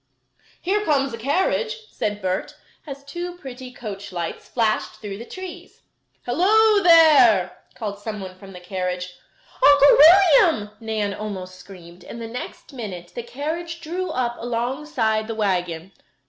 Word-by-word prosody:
"Here 410 +4 0
comes 275 - +1
a - - -5
carriage," 435 - -1
said 210 -1 -3
Bert, 185 0 -2 0.3
as 275 -1 -8
two 345 +5 -6
pretty 260 -5 -9
coach 205 -5 -8
lights 175 -2 -5
flashed 225 -3 0
through 200 -2 -8
the 235 - -8
trees. 370 -2 -10 0.4
"Hello 410 - +4
there!" 290 - +6 0.2
called 210 -5 -5
someone 205 -3 -6
from 195 +1 -13
the 180 - -10
carriage. 180 0 -4 0.5
"Uncle 285 0 +7
William!" 320 - +6
Nan 215 -3 -2
almost 190 -3 -6
screamed, 180 -2 -14
and 235 - -9
the 230 - -6
next 250 +4 -8
minute 190 -8 -7
the 240 - -5
carriage 320 +7 -5
drew 355 +3 -4
up 245 -5 -2
alongside 240 -2 -1
the 225 - -4
wagon. 180 -4 -2
235 Hz, 140 wpm, -22 LUFS, 200-310 Hz, 0.5 s, Uncle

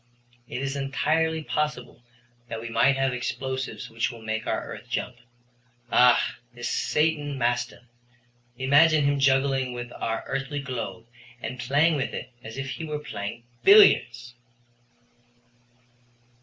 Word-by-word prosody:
It 130 - -4
is 135 0 -2
entirely 155 +4 0
possible 150 -6 -3 0.5
that 115 - -4
we 115 +1 -6
might 130 +4 +3
have 135 -1 +1
explosions 130 +1 -4
which 115 +1 -1
would 115 -2 -12
make 110 0 -3
our - - -1
earth - - -9
jump. - - -3 0.7
Ah, 125 0 +4 0.2
this 120 0 -4
Satan 150 -2 0
Maston, 120 0 -1 0.7
imagine 145 +4 +5
him 140 0 +2
juggling 135 -1 +2
with 120 0 -6
our 115 0 -3
earthly 135 +1 -3
globe 115 -6 -5 0.3
and 125 0 -6
playing 145 +6 +3
with 135 - -2
it - - -6
as 110 +3 -8
if 135 0 -4
he - - -6
were 150 -1 -3
playing 110 -5 -6 0.2
billiards!" 195 - +6
130 Hz, 130 wpm, -26 LUFS, 120-145 Hz, 0.7 s, billiards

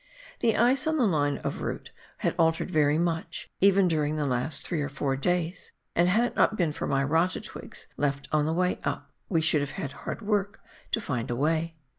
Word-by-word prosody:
The 225 -2 +2
ice 260 +6 +3
on 315 0 +1
the 255 - +3
line 145 -7 +1
of - - -3
route - - -4 0.3
had - - 0
altered 165 +2 +2
very 150 -2 +3
much, 165 0 -2
even 195 -1 +5
during 155 -2 0
the 150 -1 -1
last 125 +3 -1
three 165 -4 -2
or 140 - -2
four 135 -1 -1
days, 175 +4 -1 0.2
and 175 +1 +4
had 220 +6 +3
it 245 - -2
not 215 - +3
been 170 -4 +1
for - - -4
my 135 0 +1
rata 165 +6 +1
twigs - - -8
left 140 -1 -1
on 150 -1 +2
the - - +1
way 180 +2 +1
up, 145 0 -3 0.2
we 165 -4 +2
should 160 -2 +3
have 145 -1 -4
had 140 - -3
hard 225 - -6
work 205 0 0 0.3
to - - +1
find 125 - -3
a 120 - -1
way. 160 +4 0
160 Hz, 215 wpm, -27 LUFS, 145-185 Hz, 0.3 s, even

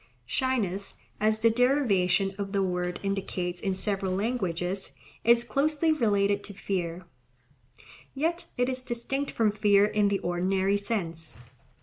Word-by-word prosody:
Shyness, 200 - -1 0.2
as 215 +1 +2
the 230 - +5
derivation 200 -7 +2
of 200 0 -4
the 195 -1 +2
word 180 -1 -2
indicates 185 -3 -2
in 195 -1 -1
several 195 -1 -1
languages, 190 - -2 0.3
is 235 +1 +5
closely 295 +7 +1
related 205 -7 +2
to 200 - -9
fear; 180 -2 -3 1.1
yet 330 +5 -1
it 245 0 +2
is 260 -1 -2
distinct 260 +3 -3
from 220 -2 +2
fear 205 -1 +4
in 210 -1 +2
the 200 0 +1
ordinary 190 +3 +1
sense. 170 - -4
200 Hz, 130 wpm, -28 LUFS, 185-235 Hz, 1.1 s, the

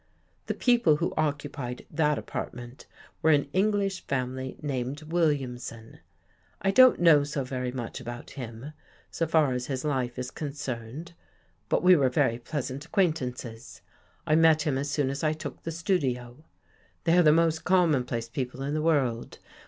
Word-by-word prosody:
The - - -1
people 240 -10 +4
who 165 +3 -2
occupied 145 -5 -3
that 150 -2 +2
apartment 120 +1 -7 0.3
were 160 - +3
an 145 -2 +4
English 195 -1 +1
family 130 0 -3
named 140 +1 -3
Williamson. 135 -8 -2 0.6
I 195 - +1
don't 255 +5 +7
know 165 -4 +6
so 145 -1 -3
very 125 -1 -3
much 125 -2 -5
about 120 -1 -8
him, 125 +2 -8 0.4
so 165 - -1
far 155 -4 +3
as 125 0 -3
his 135 0 -3
life 130 -4 -1
is 125 0 -4
con 145 -3 -5
cerned, 130 +4 -6 0.6
but - - +1
we 180 0 +8
were 135 -5 +3
very 120 -1 +1
pleasant 135 +1 -4
acquaintances. 130 - -2 0.4
I 155 - +1
met 160 -1 +5
him 150 -3 0
as 140 +2 -2
soon 140 -2 0
as 140 +2 -5
I 155 0 +2
took 155 +1 -7
the 165 - -5
studio. 145 -7 -2 0.6
They 165 0 +3
are 180 - +6
the 155 -3 +6
most 160 0 +2
commonplace 140 -11 +2
people 125 +2 -4
in 140 +2 -2
the 155 - 0
world. 135 -8 0
145 Hz, 160 wpm, -27 LUFS, 125-160 Hz, 0.6 s, we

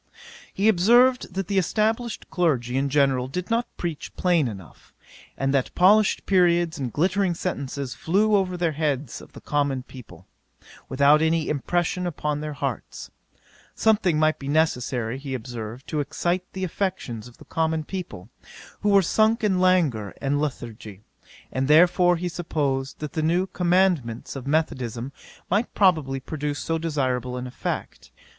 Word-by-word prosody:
'He 200 +3 0
observed, 235 +3 +4
that 195 -1 -2
the 200 -1 +2
established 220 +5 -1
clergy 135 -9 0
in 140 +1 +1
general 135 -3 +2
did 180 +9 -5
not 230 +1 +1
preach 165 -5 -4
plain 175 -6 +2
enough; 95 -7 -11 0.4
and 135 0 0
that 135 -2 0
polished 205 +3 +4
periods 175 -4 +2
and 130 -3 -3
glittering 185 - +1
sentences 140 -6 -4
flew 210 +5 +2
over 185 -2 0
the 170 -2 +1
heads 145 -4 -2
of - - -15
the - - -11
common 140 -3 -1
people, 100 -10 -13 0.6
without 140 +3 +4
any 160 0 +1
impression 175 +5 -1
upon 150 -3 -2
their 150 0 -4
hearts. 135 -4 -5 0.6
Something 210 -7 +2
might 155 0 +2
be 140 - -7
necessary, 130 -5 0
he 135 -1 -5
observed, 120 0 -7
to 155 - -1
excite 175 +5 -2
the 190 - -4
affections 175 - -3
of 120 - -16
the - - -15
common 160 -1 -1
people, 165 - -7 0.5
who 210 - 0
were 200 -1 +5
sunk 220 +6 +2
in 190 -3 +2
languor 155 - +2
and 145 +1 0
lethargy, 115 -7 -6 0.5
and 130 0 -1
therefore 175 +3 +5
he 180 +2 -3
supposed 140 -6 -2
that 150 -2 -5
the 160 - -1
new 170 +4 +2
concomitants 175 -12 0
of 135 -1 -7
methodism 130 -5 -1 0.4
might 205 +6 0
probably 155 -9 +2
produce 145 +1 -4
so 165 +2 -2
desirable 130 -6 -1
an 125 - -5
effect. 125 - -5
155 Hz, 150 wpm, -24 LUFS, 135-180 Hz, 0.6 s, were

